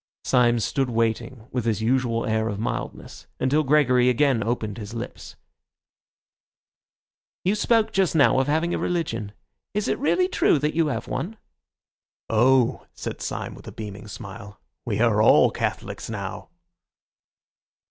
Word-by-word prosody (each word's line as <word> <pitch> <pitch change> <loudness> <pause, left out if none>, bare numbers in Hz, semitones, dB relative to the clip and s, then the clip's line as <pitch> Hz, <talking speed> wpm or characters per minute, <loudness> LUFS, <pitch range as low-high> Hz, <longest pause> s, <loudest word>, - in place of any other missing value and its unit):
Syme 120 -1 +3
stood 130 +5 0
waiting 115 +1 -1
with 125 -3 -2
his 110 -1 0
usual 120 -1 +1
air 110 0 0
of 105 -2 -3
mildness 115 - -5
until 140 +4 +2
Gregory 130 -4 +4
again 125 -2 +2
opened 110 -1 -2
his 105 +2 -7
lips. 115 - -7 2.1
"You 190 - +3
spoke 220 +1 +2
just 190 -4 +1
now 140 -3 +5
of 130 - +1
having 160 +4 +1
a - - -1
religion. 115 - -2 0.4
Is 210 0 0
it - - 0
really 360 +6 +2
true 370 - +3
that 150 +2 -1
you 165 -1 +2
have 145 - -3
one?" 215 +6 -4 0.9
"Oh," 125 +2 +3
said - - -6
Syme - - -4
with - - -13
a - - -6
beaming 105 -1 -8
smile, 100 -1 -9 0.3
"we - - -1
are - - +3
all - - +6
Catholics - - -4
now." 100 -4 -6
125 Hz, 145 wpm, -24 LUFS, 110-150 Hz, 2.1 s, all